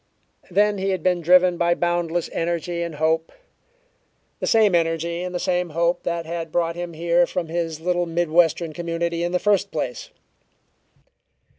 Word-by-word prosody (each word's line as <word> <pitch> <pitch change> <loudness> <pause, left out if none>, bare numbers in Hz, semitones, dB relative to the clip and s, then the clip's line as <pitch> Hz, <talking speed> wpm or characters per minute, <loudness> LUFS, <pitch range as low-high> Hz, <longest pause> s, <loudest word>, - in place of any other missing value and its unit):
Then 205 +2 +2
he 195 +1 -1
had 185 -4 -2
been 180 -1 +1
driven 180 +1 +5
by 170 0 +3
boundless 175 -1 -1
energy 170 +1 -2
and 170 -2 -4
hope 160 +2 0 1.1
the - - -2
same 215 -4 +4
energy 170 0 0
and 180 0 -5
the - - -1
same 180 -1 0
hope 170 +1 +1
that 170 -1 -3
had 165 -1 -5
brought 170 0 0
him 175 -1 -5
here 170 +2 +2
from 170 -3 -3
his 165 -2 -3
little 175 +1 0
mid 170 -1 -1
western 165 -1 +2
community 170 0 -2
in 175 - -1
the 180 - +2
first 205 +1 +1
place. - - -4
170 Hz, 165 wpm, -22 LUFS, 165-180 Hz, 1.1 s, driven